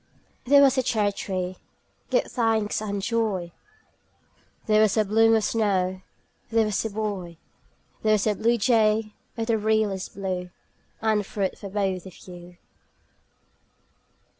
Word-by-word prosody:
There 280 Hz, +2 st, +6 dB
was 270 Hz, -1 st, +4 dB
a -, -, +4 dB
cherry 215 Hz, -4 st, +1 dB
tree, 185 Hz, -2 st, -4 dB, 0.5 s
give -, -, +2 dB
thanks 225 Hz, -4 st, 0 dB
and 200 Hz, -2 st, -3 dB
joy! 215 Hz, -7 st, -1 dB, 1.1 s
There 215 Hz, 0 st, +4 dB
was 215 Hz, 0 st, +3 dB
a 215 Hz, -, +3 dB
bloom 225 Hz, +2 st, +4 dB
of 220 Hz, -, +1 dB
snow 190 Hz, -5 st, 0 dB, 0.5 s
There 225 Hz, 0 st, +2 dB
was 210 Hz, -2 st, -1 dB
a 220 Hz, -, -2 dB
boy 200 Hz, -5 st, -4 dB, 0.6 s
There 215 Hz, 0 st, +3 dB
was 210 Hz, -2 st, +1 dB
a 215 Hz, -, +2 dB
bluejay 220 Hz, -1 st, +2 dB, 0.2 s
of 225 Hz, -, -1 dB
the 225 Hz, -1 st, +1 dB
realest 210 Hz, -3 st, 0 dB
blue 185 Hz, -2 st, -4 dB, 0.5 s
And 215 Hz, -2 st, +2 dB
fruit 195 Hz, -1 st, -3 dB
for 200 Hz, -, -9 dB
both 190 Hz, -2 st, -2 dB
of 185 Hz, -, -13 dB
you. 175 Hz, -1 st, -12 dB
210 Hz, 140 wpm, -25 LUFS, 190-225 Hz, 1.1 s, There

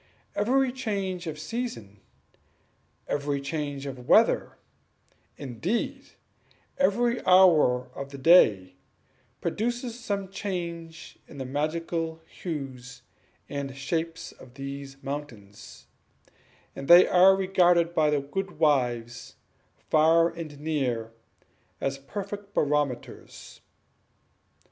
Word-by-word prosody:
Every 255 Hz, +5 st, +2 dB
change 195 Hz, -8 st, -3 dB
of 155 Hz, -1 st, -5 dB
season, 155 Hz, -, -5 dB, 1.1 s
every 145 Hz, -1 st, -1 dB
change 145 Hz, -1 st, -4 dB
of 130 Hz, -3 st, -8 dB
weather, -, -, +4 dB, 0.8 s
indeed, 140 Hz, -, -3 dB, 0.7 s
every 240 Hz, -1 st, +2 dB
hour 155 Hz, -9 st, +5 dB
of 140 Hz, 0 st, -7 dB
the 140 Hz, -, -9 dB
day, 105 Hz, -, +5 dB, 0.6 s
produces 240 Hz, +1 st, -2 dB
some 200 Hz, -3 st, -3 dB
change 170 Hz, -5 st, -6 dB
in 145 Hz, -, -13 dB
the 135 Hz, -, -5 dB
magical 160 Hz, +3 st, -2 dB
hues 130 Hz, -6 st, -7 dB, 0.4 s
and 140 Hz, -1 st, -5 dB
shapes 165 Hz, +4 st, -3 dB
of 130 Hz, -1 st, -16 dB
these 140 Hz, 0 st, -7 dB
mountains, 130 Hz, -8 st, -8 dB, 0.9 s
and 135 Hz, -, -7 dB
they 175 Hz, +1 st, +9 dB
are 185 Hz, +2 st, +6 dB
regarded 180 Hz, -3 st, +3 dB
by 155 Hz, -2 st, +2 dB
all 150 Hz, -, +3 dB
the 145 Hz, -, +1 dB
good 190 Hz, +2 st, -4 dB
wives, 125 Hz, -6 st, 0 dB, 0.6 s
far 165 Hz, +2 st, +5 dB
and 155 Hz, -4 st, -8 dB
near, 130 Hz, -7 st, -2 dB, 0.7 s
as 135 Hz, 0 st, -2 dB
perfect 200 Hz, +6 st, -7 dB
barometers. 145 Hz, -4 st, -2 dB
155 Hz, 100 wpm, -27 LUFS, 135-185 Hz, 1.1 s, they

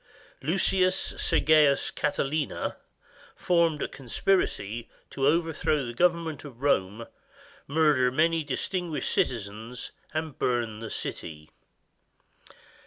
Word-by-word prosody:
Lucius 185 Hz, +3 st, +2 dB, 0.2 s
Sergius 150 Hz, -3 st, +4 dB
Catiline 145 Hz, 0 st, -1 dB, 0.6 s
formed 170 Hz, -4 st, +2 dB
a -, -, -1 dB
conspiracy 120 Hz, -, -1 dB, 0.2 s
to 135 Hz, 0 st, 0 dB
overthrow 155 Hz, -2 st, +1 dB
the 120 Hz, -, -5 dB
government 165 Hz, 0 st, +1 dB
of 135 Hz, -3 st, -11 dB
Rome, 110 Hz, -4 st, +1 dB, 0.6 s
murder 145 Hz, -4 st, +3 dB
many 160 Hz, +4 st, +2 dB
distinguished 165 Hz, +4 st, -2 dB
citizens, 110 Hz, +1 st, -2 dB, 0.2 s
and 155 Hz, -3 st, -4 dB
burn 120 Hz, -3 st, 0 dB
the 115 Hz, 0 st, -6 dB
city. 75 Hz, -1 st, -6 dB
145 Hz, 95 wpm, -27 LUFS, 120-160 Hz, 0.6 s, Sergius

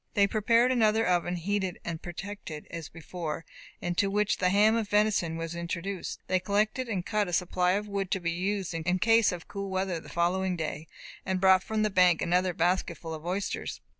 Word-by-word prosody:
They 200 Hz, -2 st, +5 dB
prepared 230 Hz, +4 st, +3 dB
another 225 Hz, -2 st, +3 dB
oven, 175 Hz, 0 st, +1 dB
heated 190 Hz, +1 st, -2 dB
and 165 Hz, -2 st, -4 dB
protected 175 Hz, -3 st, -7 dB
as 165 Hz, -3 st, -6 dB
before, 165 Hz, -1 st, -6 dB, 0.4 s
into 175 Hz, +3 st, 0 dB
which 210 Hz, +1 st, +1 dB
the 180 Hz, -, +3 dB
ham 210 Hz, +3 st, +4 dB
of 220 Hz, -3 st, -1 dB
venison 205 Hz, -6 st, +2 dB
was 165 Hz, 0 st, -4 dB
introduced. 170 Hz, +2 st, -4 dB
They 185 Hz, -, +1 dB
collected 210 Hz, +6 st, 0 dB
and 190 Hz, -5 st, -2 dB
cut 210 Hz, -2 st, 0 dB
a 175 Hz, -, -5 dB
supply 180 Hz, +1 st, +2 dB
of 205 Hz, +2 st, -1 dB
wood 200 Hz, -2 st, -2 dB
to 190 Hz, -, 0 dB
be 170 Hz, -1 st, -1 dB
used 190 Hz, +2 st, -2 dB
in 165 Hz, +3 st, 0 dB
case 225 Hz, +2 st, +4 dB
of 175 Hz, -2 st, -7 dB
cool 200 Hz, -1 st, -5 dB
weather 190 Hz, -2 st, -1 dB
the -, -, -13 dB
following 180 Hz, +2 st, 0 dB
day, 160 Hz, -1 st, -4 dB, 0.4 s
and 190 Hz, 0 st, -1 dB
brought 190 Hz, 0 st, +6 dB
from 215 Hz, +2 st, -1 dB
the 215 Hz, -, +1 dB
bank 180 Hz, -3 st, +5 dB
another 180 Hz, +1 st, +1 dB
basket 175 Hz, 0 st, +1 dB
full 165 Hz, -1 st, -7 dB
of 160 Hz, +1 st, -7 dB
oysters. 195 Hz, +3 st, -3 dB
185 Hz, 195 wpm, -29 LUFS, 170-205 Hz, 0.4 s, brought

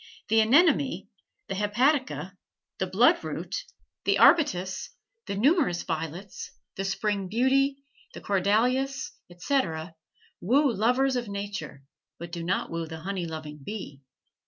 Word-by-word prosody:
The 225 Hz, +1 st, +4 dB
anemone, 275 Hz, +4 st, +3 dB, 0.4 s
the -, -, -3 dB
hepatica, 210 Hz, 0 st, +1 dB, 0.5 s
the -, -, 0 dB
bloodroot, -, -, +2 dB, 0.5 s
the -, -, +2 dB
arbutus, 190 Hz, -, +3 dB, 0.4 s
the 200 Hz, -, -2 dB
numerous 260 Hz, -, +2 dB
violets, 165 Hz, +4 st, -5 dB, 0.3 s
the 195 Hz, -, -3 dB
spring 200 Hz, 0 st, -1 dB
beauty, 270 Hz, +6 st, +2 dB, 0.3 s
the -, -, -8 dB
corydalis, 245 Hz, +8 st, +1 dB, 0.2 s
etc., 175 Hz, -, -1 dB, 0.5 s
woo 265 Hz, +6 st, +3 dB
lovers 250 Hz, +6 st, +2 dB
of 240 Hz, -2 st, -2 dB
nature, 200 Hz, -9 st, -6 dB, 0.3 s
but 170 Hz, 0 st, -8 dB
do 170 Hz, -1 st, -5 dB
not 185 Hz, +3 st, -1 dB
woo 165 Hz, -1 st, -3 dB
the 160 Hz, 0 st, -8 dB
honey 185 Hz, -1 st, -3 dB
loving 155 Hz, -2 st, -7 dB
bee. 185 Hz, -8 st, -7 dB
205 Hz, 120 wpm, -27 LUFS, 175-260 Hz, 0.5 s, The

